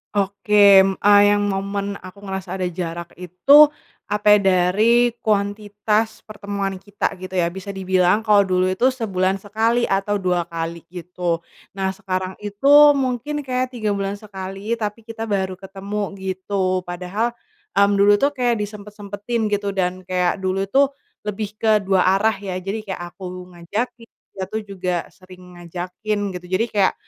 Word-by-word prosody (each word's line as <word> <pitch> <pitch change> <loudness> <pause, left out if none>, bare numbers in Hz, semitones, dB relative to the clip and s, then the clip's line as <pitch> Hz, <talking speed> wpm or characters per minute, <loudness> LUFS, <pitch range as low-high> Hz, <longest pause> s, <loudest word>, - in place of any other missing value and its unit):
Oke, 200 0 +5
m 195 - 0
eee, 205 0 +6
yang 205 0 +1
momen 200 +1 -3
aku 185 +2 -13
ngerasa 190 -2 -5
ada 185 -1 -2
jarak 170 -1 -5
itu, 180 - +6 0.4
apa 210 0 +4
ya, - - -1
dari 210 +7 +4 0.2
kuantitas 210 +1 0
pertemuan 200 -2 -4
kita, 205 +2 -3
gitu 185 +1 -9
ya, 175 -2 +1
bisa 190 +2 -7
dibilang 190 +1 +2
kalo 210 -2 +4
dulu 185 0 +1
itu 250 +8 +2
sebulan 195 -5 -1
sekali 225 +4 0
atau 200 +1 0
dua 180 -2 0
kali 165 0 -5
gitu. 175 -1 -4 0.3
Nah 195 -1 -1
sekarang 190 -1 -4
itu 205 +8 +2 0.2
mungkin 270 +2 -2
kayak 255 -1 -2
3 220 -3 -2
bulan 200 -1 -1
sekali, 200 +2 -5
tapi 210 +1 -4
kita 225 0 -6
baru 190 -3 -2
ketemu 195 +1 -5
gitu. 185 -1 -2
Padahal, 185 +7 -3 0.4
mmm, 200 0 +4
dulu 200 +1 +6
tuh 280 - +4
kayak 240 -3 +1
disempet-sempetin 210 +2 -4
gitu, 205 -1 -1
dan 185 -1 -2
kayak 180 +1 0
dulu 190 +1 -2
tuh, 275 +4 +3 0.3
lebih 210 0 -4
ke 215 -2 +3
dua 190 -2 +2
arah 200 +4 +3
ya, 195 -2 -6
jadi 205 +3 -4
kayak 190 -3 -5
aku 180 -1 -8
ngajakin, 230 +7 -4 0.2
dia 190 - -5
tuh 220 - -2
juga 185 -3 -3
sering 185 -1 -16
ngajakin, 180 +5 -4 0.2
gitu. 180 0 -8
Jadi 230 - +1
kayak, 200 -4 +2
200 Hz, 155 wpm, -21 LUFS, 185-210 Hz, 0.4 s, eee